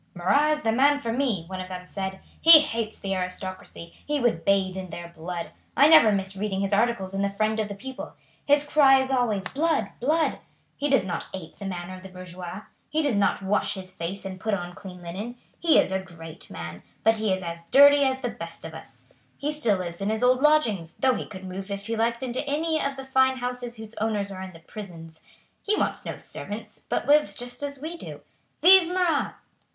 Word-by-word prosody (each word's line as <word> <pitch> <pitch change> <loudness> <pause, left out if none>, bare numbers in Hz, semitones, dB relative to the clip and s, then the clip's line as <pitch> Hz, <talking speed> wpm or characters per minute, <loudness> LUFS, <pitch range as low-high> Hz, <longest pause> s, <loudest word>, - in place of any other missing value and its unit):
"Marat 275 +13 +3
is 305 0 +1
the 225 - +2
man 280 +5 +4
for 230 -5 -3
me," 240 -9 0
one 185 +1 -6
of 185 - -7
them 180 -1 -7
said. 190 0 -5 0.2
"He 325 -2 +10
hates 230 -7 -3
the 195 -1 -2
aristocracy; 185 -2 -5
he 295 0 -1
would 230 -10 +1
bathe 190 0 +2
in 190 -1 -6
their 170 +1 -7
blood. 170 +1 -6 0.3
I 280 - +7
never 310 -9 +8
miss 195 -1 -1
reading 195 -1 -2
his 195 +1 0
articles 200 -3 +1
in 195 - -1
the 200 - +1
Friend 215 +2 0
of 215 - 0
the 200 - -6
People. 260 +6 -8 0.3
His 290 0 +4
cry 285 -2 +5
is 265 0 -1
always 230 -7 +1
'Blood! 285 -9 0
Blood!' 310 +6 +1 0.4
He 290 - -1
does 270 -8 +3
not 175 -3 -3
ape 175 -4 -9
the 200 - -6
manner 180 -1 -5
of 185 - -10
the 190 - -10
bourgeois. 185 +1 -8 0.3
He 310 +1 0
does 285 -6 +1
not 200 -1 +1
wash 200 +2 +1
his 185 -1 -7
face 185 +3 -5
and 190 -1 -6
put 215 +1 0
on 175 -2 -6
clean 180 -1 -11
linen. 200 +8 -6 0.2
He 335 -2 +4
is - - +3
a 190 - 0
great 165 -3 -11
man, 85 -1 -7 0.2
but 225 0 +4
he 215 -2 0
is 190 0 -1
as 170 0 -6
dirty 285 +2 +7
as 265 -1 0
the 245 - -1
best 170 -6 -9
of 160 - -7
us. 160 - -13 0.3
He 295 +2 -2
still 235 -10 +1
lives 175 0 -6
in 200 - 0
his 220 +2 -1
old 255 +1 +4
lodgings, 230 - +2
though 260 -1 +3
he - - -4
could 190 -2 -9
move 190 +2 -6
if 200 0 -5
he 230 - -2
liked 235 +2 0
into 255 +1 -2
any 315 +2 0
of 275 0 -2
the 270 0 -8
fine 265 0 +3
houses 245 -1 -4
whose 220 0 -9
owners 210 -2 -1
are 190 -1 -7
in 190 -1 -8
the 165 - -14
prisons. 165 -5 -10 0.4
He 425 - +1
wants - - -1
no - - -5
servants, 210 +1 -8
but - - -1
lives 295 +2 +4
just 245 +2 -6
as 285 -1 -4
we 320 +4 -6
do. - - -9 0.4
Vive 370 0 +8
Marat!" 355 -4 0
210 Hz, 225 wpm, -26 LUFS, 185-265 Hz, 0.4 s, He